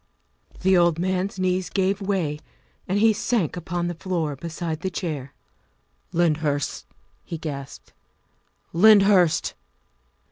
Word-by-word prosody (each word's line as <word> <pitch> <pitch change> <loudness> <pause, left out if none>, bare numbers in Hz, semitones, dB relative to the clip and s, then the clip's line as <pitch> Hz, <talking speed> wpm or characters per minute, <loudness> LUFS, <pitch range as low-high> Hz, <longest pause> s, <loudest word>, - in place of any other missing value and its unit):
The 190 +1 +4
old 170 -2 +4
man's 185 +2 -1
knees 185 -1 0
gave 195 +1 0
way 185 -7 -1 0.5
and 190 +1 0
he 220 +1 +5
sank 210 - 0
upon 175 0 -3
the 175 - -2
floor 165 -4 -2
beside 165 +1 -5
the 190 - -2
chair. 150 -7 -4 0.4
" - - -44
Lyndhurst!" 155 -4 0 0.4
he 165 - -6
gasped, 140 -4 -7 0.4
" - - -43
Lyndhurst!" 195 -2 +5
175 Hz, 120 wpm, -24 LUFS, 155-190 Hz, 0.5 s, he